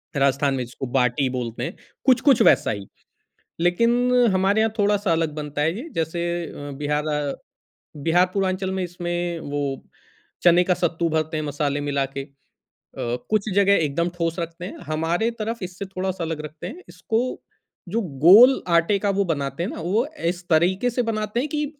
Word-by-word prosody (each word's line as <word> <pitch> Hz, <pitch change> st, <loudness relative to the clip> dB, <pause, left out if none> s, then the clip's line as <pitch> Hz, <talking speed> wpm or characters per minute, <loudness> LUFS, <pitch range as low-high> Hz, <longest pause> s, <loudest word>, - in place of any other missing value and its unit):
राजस्थान 140 Hz, 0 st, +2 dB
में 130 Hz, -1 st, -1 dB
जिसको 125 Hz, +2 st, -7 dB
बाटी 125 Hz, +2 st, +2 dB
बोलते 120 Hz, -2 st, -4 dB
हैं, -, -, -4 dB, 0.3 s
कुछ-कुछ 260 Hz, 0 st, +5 dB
वैसा -, -, +5 dB
ही। 100 Hz, -2 st, -5 dB, 0.7 s
लेकिन 175 Hz, +7 st, +3 dB, 0.4 s
हमारे 195 Hz, +3 st, +2 dB
यहाँ 220 Hz, -1 st, +1 dB
थोड़ा-सा 205 Hz, -3 st, +2 dB
अलग 160 Hz, -2 st, +1 dB
बनता 150 Hz, -1 st, -4 dB
है 160 Hz, +3 st, +1 dB
ये, 275 Hz, +8 st, -7 dB
जैसे 165 Hz, +1 st, -1 dB, 0.2 s
अ, 145 Hz, -2 st, -8 dB
बिहार 150 Hz, +1 st, -1 dB
अ, 150 Hz, -2 st, -1 dB, 0.6 s
बिहार 165 Hz, +5 st, +3 dB
पूर्वांचल 190 Hz, -1 st, -1 dB
में 190 Hz, -1 st, -2 dB
इसमें 175 Hz, -1 st, -3 dB
वो 145 Hz, -1 st, -4 dB, 0.8 s
चने 175 Hz, 0 st, +6 dB
का 180 Hz, 0 st, +2 dB
सत्तू 170 Hz, -1 st, 0 dB
भरते 155 Hz, 0 st, -1 dB
हैं 155 Hz, -, -2 dB
मसाले 145 Hz, 0 st, -1 dB
मिला 140 Hz, -1 st, 0 dB
के। 135 Hz, -, -1 dB
अ, 145 Hz, -, -17 dB, 1.0 s
कुछ 215 Hz, 0 st, +1 dB
जगह 200 Hz, 0 st, +5 dB
एकदम 170 Hz, +5 st, -1 dB
ठोस 165 Hz, 0 st, -1 dB
रखते 170 Hz, +1 st, -5 dB
हैं, -, -, -8 dB
हमारे 165 Hz, +8 st, 0 dB
तरफ 225 Hz, +2 st, -3 dB
इससे 185 Hz, +2 st, -6 dB
थोड़ा-सा 190 Hz, -2 st, -3 dB
अलग 160 Hz, -2 st, -3 dB
रखते 150 Hz, +1 st, -8 dB
हैं, 355 Hz, -, -9 dB
इसको 225 Hz, -1 st, -1 dB, 0.7 s
जो 225 Hz, +5 st, 0 dB, 0.2 s
गोल 240 Hz, +9 st, +8 dB, 0.2 s
आटे 195 Hz, +5 st, +2 dB
का 205 Hz, -, 0 dB
वो 200 Hz, -, +3 dB
बनाते 140 Hz, -2 st, -2 dB
हैं -, -, -2 dB
ना -, -, -6 dB
वो 200 Hz, +9 st, +1 dB, 0.3 s
इस 180 Hz, 0 st, -11 dB
तरीके 180 Hz, +8 st, +3 dB
से 245 Hz, +1 st, -1 dB
बनाते 215 Hz, +1 st, -2 dB
हैं 280 Hz, +4 st, -2 dB
कि 300 Hz, 0 st, -1 dB
175 Hz, 175 wpm, -23 LUFS, 150-200 Hz, 1.0 s, गोल